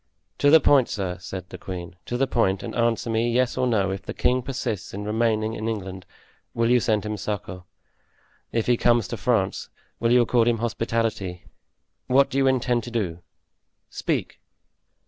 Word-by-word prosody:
"To 145 Hz, -, +5 dB
the 160 Hz, +2 st, +8 dB
point, 140 Hz, -4 st, +4 dB
sir," 95 Hz, -3 st, -3 dB
said 95 Hz, -1 st, -7 dB
the -, -, -9 dB
queen, 90 Hz, -2 st, -7 dB
"to 120 Hz, -, -2 dB
the 135 Hz, -, +2 dB
point, 100 Hz, -7 st, +1 dB
and -, -, -5 dB
answer 115 Hz, -1 st, +1 dB
me, 115 Hz, +1 st, +1 dB
yes 125 Hz, +1 st, +1 dB
or 130 Hz, 0 st, +1 dB
no; 100 Hz, -5 st, +1 dB
if 95 Hz, -, -4 dB
the -, -, -7 dB
king 125 Hz, +1 st, +2 dB
persists 120 Hz, -7 st, -4 dB
in 105 Hz, +1 st, -5 dB
remaining 110 Hz, 0 st, 0 dB
in 110 Hz, 0 st, -4 dB
England 95 Hz, -4 st, -5 dB, 0.5 s
will 115 Hz, 0 st, +2 dB
you 125 Hz, -, +5 dB
send 110 Hz, -3 st, 0 dB
him 105 Hz, 0 st, -3 dB
succor? 95 Hz, -3 st, -5 dB, 0.9 s
If 115 Hz, -1 st, 0 dB
he 120 Hz, -1 st, +3 dB
comes 120 Hz, -1 st, +3 dB
to -, -, -3 dB
France 110 Hz, -7 st, 0 dB, 0.3 s
will 115 Hz, -, +1 dB
you 125 Hz, 0 st, +6 dB
accord 120 Hz, -1 st, +2 dB
him 120 Hz, -1 st, +3 dB
hospitality? 115 Hz, -5 st, -2 dB, 0.6 s
What 135 Hz, +2 st, +4 dB
do 135 Hz, -, 0 dB
you 135 Hz, -, +3 dB
intend 125 Hz, -2 st, +1 dB
to -, -, -6 dB
do? 100 Hz, -8 st, -2 dB, 0.7 s
Speak." -, -, -2 dB
115 Hz, 185 wpm, -24 LUFS, 100-120 Hz, 0.9 s, the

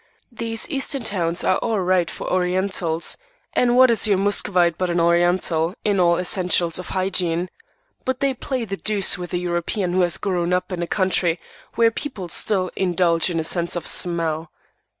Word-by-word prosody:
These 225 Hz, -1 st, -1 dB
Eastern 275 Hz, -2 st, -1 dB
towns 175 Hz, -5 st, -1 dB
are 185 Hz, -, +1 dB
all 225 Hz, -3 st, -1 dB
right 185 Hz, -2 st, +1 dB
for -, -, -7 dB
Orientals; 180 Hz, -2 st, -1 dB, 0.4 s
and 245 Hz, 0 st, +2 dB
what 255 Hz, -1 st, +6 dB
is 225 Hz, -1 st, +5 dB
your 200 Hz, -2 st, +2 dB
Muscovite 185 Hz, -3 st, +2 dB
but 185 Hz, +1 st, -2 dB
an 175 Hz, 0 st, 0 dB
Oriental, 170 Hz, 0 st, +1 dB
in 205 Hz, -2 st, +1 dB
all 170 Hz, -1 st, +3 dB
essentials 180 Hz, -2 st, +1 dB
of 180 Hz, -, -8 dB
hygiene? 180 Hz, -2 st, -1 dB, 0.5 s
But 260 Hz, -1 st, -2 dB
they 275 Hz, -2 st, +1 dB
play 255 Hz, -1 st, -4 dB
the 195 Hz, -2 st, -5 dB
deuce 200 Hz, -3 st, +3 dB
with 175 Hz, -1 st, -7 dB
a 175 Hz, -, -1 dB
European 175 Hz, +2 st, -2 dB
who 185 Hz, -, +2 dB
has 175 Hz, -2 st, +2 dB
grown 180 Hz, -3 st, -1 dB
up 180 Hz, +2 st, -1 dB
in 180 Hz, -1 st, -4 dB
a 170 Hz, -, -3 dB
country 185 Hz, -3 st, 0 dB, 0.4 s
where 230 Hz, -1 st, +3 dB
people 220 Hz, -, -6 dB
still 185 Hz, +1 st, +1 dB
indulge 175 Hz, -2 st, +1 dB
in 170 Hz, -2 st, -2 dB
a -, -, -2 dB
sense 170 Hz, +2 st, +1 dB
of 175 Hz, -, -4 dB
smell." 165 Hz, -2 st, 0 dB
180 Hz, 180 wpm, -21 LUFS, 170-205 Hz, 0.5 s, what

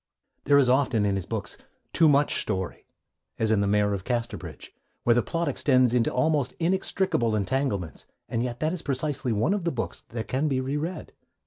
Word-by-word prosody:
There 140 Hz, 0 st, +5 dB
is 140 Hz, -3 st, +5 dB
often, 125 Hz, -4 st, +2 dB
in 100 Hz, -1 st, +1 dB
his 95 Hz, -, -4 dB
books, -, -, -4 dB, 0.4 s
too 160 Hz, -2 st, +5 dB
much 145 Hz, 0 st, +3 dB
story, 95 Hz, -3 st, -4 dB, 0.5 s
as 110 Hz, -1 st, +1 dB
in 110 Hz, -, +3 dB
The 100 Hz, -, +1 dB
Mayor 105 Hz, 0 st, +2 dB
of 95 Hz, -2 st, -4 dB
Casterbridge, 120 Hz, 0 st, -4 dB, 0.3 s
where 120 Hz, -, +4 dB
the 120 Hz, -, +3 dB
plot 170 Hz, +5 st, -2 dB
extends 130 Hz, -3 st, +3 dB
into 120 Hz, -2 st, +2 dB
almost 140 Hz, 0 st, +1 dB
inextricable 175 Hz, -, +1 dB
entanglements; 100 Hz, -, -2 dB, 0.2 s
and 115 Hz, -, -2 dB
yet 120 Hz, -1 st, -3 dB
that 155 Hz, +2 st, +1 dB
is 180 Hz, -, -4 dB
precisely 135 Hz, -2 st, -2 dB
one 110 Hz, -, +1 dB
of 205 Hz, -3 st, -2 dB
the 170 Hz, -, 0 dB
books 115 Hz, -, -4 dB
that 115 Hz, -1 st, -5 dB
can 135 Hz, +4 st, 0 dB
be 135 Hz, -3 st, 0 dB
re 130 Hz, +2 st, -2 dB
read. 160 Hz, +3 st, -4 dB
130 Hz, 195 wpm, -26 LUFS, 110-150 Hz, 0.5 s, There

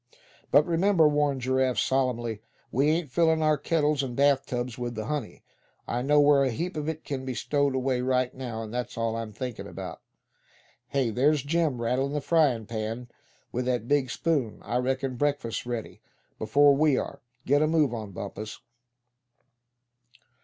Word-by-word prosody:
"But 150 Hz, -, +5 dB
remember," 170 Hz, -1 st, +4 dB
warned 145 Hz, -2 st, +1 dB
Giraffe, 130 Hz, 0 st, +1 dB
solemnly, 120 Hz, -5 st, 0 dB, 0.3 s
"we 135 Hz, +4 st, +2 dB
ain't 160 Hz, -3 st, 0 dB
fillin' 160 Hz, +2 st, +3 dB
our 155 Hz, 0 st, +4 dB
kettles 150 Hz, -1 st, +1 dB
an' 125 Hz, -2 st, -4 dB
bath 140 Hz, 0 st, +3 dB
tubs 120 Hz, -1 st, -3 dB
with 120 Hz, -1 st, -4 dB
the 110 Hz, 0 st, -4 dB
honey. 145 Hz, -3 st, -4 dB, 0.4 s
I 120 Hz, -, -1 dB
know 145 Hz, +3 st, +4 dB
where 145 Hz, -1 st, +5 dB
a 135 Hz, -, +2 dB
heap 170 Hz, +10 st, -3 dB
of 150 Hz, 0 st, -2 dB
it 160 Hz, 0 st, -6 dB
c'n 135 Hz, -2 st, -4 dB
be 130 Hz, -1 st, -4 dB
stowed 140 Hz, 0 st, 0 dB
away 130 Hz, -1 st, 0 dB
right 130 Hz, 0 st, +1 dB
now; 120 Hz, -4 st, -5 dB
and 110 Hz, 0 st, -8 dB
that's 125 Hz, -1 st, -4 dB
all 115 Hz, -1 st, -1 dB
I'm 115 Hz, -1 st, -4 dB
thinkin' 120 Hz, +2 st, -6 dB
about. -, -, -8 dB, 0.9 s
Hey! 130 Hz, -3 st, 0 dB
there's 140 Hz, +4 st, +2 dB
Jim 155 Hz, -3 st, 0 dB
rattling 130 Hz, +4 st, 0 dB
the 150 Hz, -, 0 dB
frying 140 Hz, -8 st, +2 dB
pan 115 Hz, +2 st, -4 dB, 0.4 s
with 125 Hz, +1 st, -2 dB
that 125 Hz, -2 st, -1 dB
big 140 Hz, -2 st, +2 dB
spoon. 140 Hz, -5 st, -1 dB
I 120 Hz, +4 st, -1 dB
reckon 130 Hz, 0 st, -1 dB
breakfast's 140 Hz, -5 st, -1 dB
ready, 120 Hz, -2 st, -5 dB, 0.4 s
before 145 Hz, +5 st, +5 dB
we 150 Hz, -2 st, +3 dB
are. -, -, -4 dB, 0.2 s
Get 145 Hz, +2 st, +3 dB
a 155 Hz, -, +3 dB
move 155 Hz, -5 st, +2 dB
on, 110 Hz, -3 st, -5 dB
Bumpus!" 105 Hz, +3 st, -7 dB
130 Hz, 170 wpm, -27 LUFS, 120-145 Hz, 0.9 s, But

